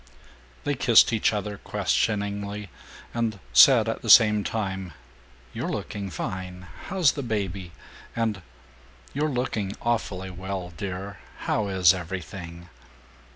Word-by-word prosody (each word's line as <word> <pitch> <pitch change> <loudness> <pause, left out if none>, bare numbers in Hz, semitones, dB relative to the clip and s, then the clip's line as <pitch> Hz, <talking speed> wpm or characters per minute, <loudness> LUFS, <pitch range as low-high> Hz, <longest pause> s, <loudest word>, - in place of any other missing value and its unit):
They 145 - 0
kissed 125 -3 +5
each 110 - +2
other 105 -1 -4
questioningly, 100 -1 -1 0.4
and 115 -3 -1 0.2
said - - +7
at - - -2
the - - -5
same 105 -1 +7
time, 95 -6 -3 0.6
"You're - - -3
looking 100 -2 -4
fine; 90 +1 -5 0.2
how's 180 -7 +3
the 140 - -5
baby?" 100 -7 -3 0.4
and 110 -4 -1 0.7
"You're 150 +3 0
looking 120 -7 -2
awfully 95 -5 -2
well, 95 -1 -5
dear; 100 +3 -6 0.2
how 105 - 0
is 95 -2 +5
everything?" 85 -1 -7
100 Hz, 115 wpm, -25 LUFS, 95-110 Hz, 0.7 s, said